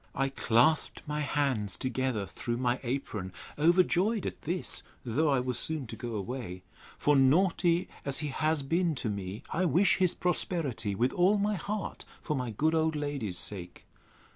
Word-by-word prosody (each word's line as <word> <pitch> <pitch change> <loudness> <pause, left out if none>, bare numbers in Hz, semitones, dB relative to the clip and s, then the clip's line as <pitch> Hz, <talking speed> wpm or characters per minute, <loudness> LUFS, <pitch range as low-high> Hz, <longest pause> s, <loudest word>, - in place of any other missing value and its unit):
I 135 0 +1
clasped 135 +4 +2
my 150 0 -2
hands 140 -8 0
together 130 -5 -1
through 120 +6 -4
my 125 0 +1
apron, 120 -7 -3 0.3
overjoyed 180 +6 +3
at - - -4
this, 175 +4 -2 0.2
though 145 +7 +1
I 135 -2 +3
was 125 -1 -2
soon 155 -4 -3
to 115 - -7
go 120 -2 -5
away: 100 -3 -5 0.3
For, 145 - +3
naughty 170 +5 +3 0.2
as 140 -1 -2
he 150 -1 -3
has 155 +1 0
been 165 +3 +1
to 120 - -2
me, 100 +4 -5
I 185 +3 +1
wish 175 +5 +4
his 185 -2 +3
prosperity 150 - 0
with 120 +6 +1
all 185 +4 +4
my 205 +1 +1
heart, 205 +2 -4 0.2
for 155 - -1
my 125 -3 -2
good 155 +9 +1
old 160 -1 +2
lady's 140 -11 -3
sake. 90 -3 -6
140 Hz, 165 wpm, -30 LUFS, 120-165 Hz, 0.3 s, wish